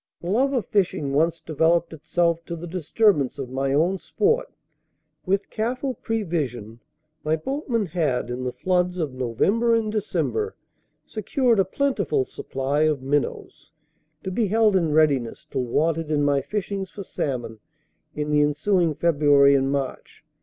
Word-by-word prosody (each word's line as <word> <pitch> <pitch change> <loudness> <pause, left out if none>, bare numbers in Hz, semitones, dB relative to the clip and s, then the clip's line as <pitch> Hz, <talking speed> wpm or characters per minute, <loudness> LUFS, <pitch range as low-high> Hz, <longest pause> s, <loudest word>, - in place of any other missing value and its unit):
The 175 - -4
love 265 +6 +2
of 245 -7 0
fishing 170 -8 0
once 165 +3 +2
developed 165 +2 +1
itself 170 +2 0
to 170 - -5
the 170 +1 -7
disturbance 175 - +1
of 130 -3 -6
my 135 +1 -1
own 170 +7 +2
sport. 460 - 0 0.8
With 195 +1 0
careful 250 +4 -2
prevision, 145 - -3 0.4
my 155 +1 +1
boatman 240 - -2
had, 155 -8 -1
in 125 +1 -4
the 125 - -2
floods 180 +3 0
of 155 -6 -2
November 195 - +1
and 220 -2 0
December, 430 - -1 0.5
secured 230 +1 +1
a 195 - +4
plentiful 205 - 0
supply 135 +4 -2
of 155 -4 +1
minnows, 145 +1 -2 0.5
to 190 - -3
be 215 +3 +1
held 215 0 +3
in 170 -4 +2
readiness 145 -6 +2
till 130 - -1
wanted 160 +5 0
in 150 -1 +1
my 140 -1 +2
fishings 195 +4 -4
for 200 +1 -8
salmon 120 - -4 0.6
in 150 0 -2
the 150 0 +4
ensuing 160 +3 +1
February 145 -4 +4
and 135 0 +2
March. 140 -2 -4
165 Hz, 150 wpm, -24 LUFS, 140-205 Hz, 0.8 s, a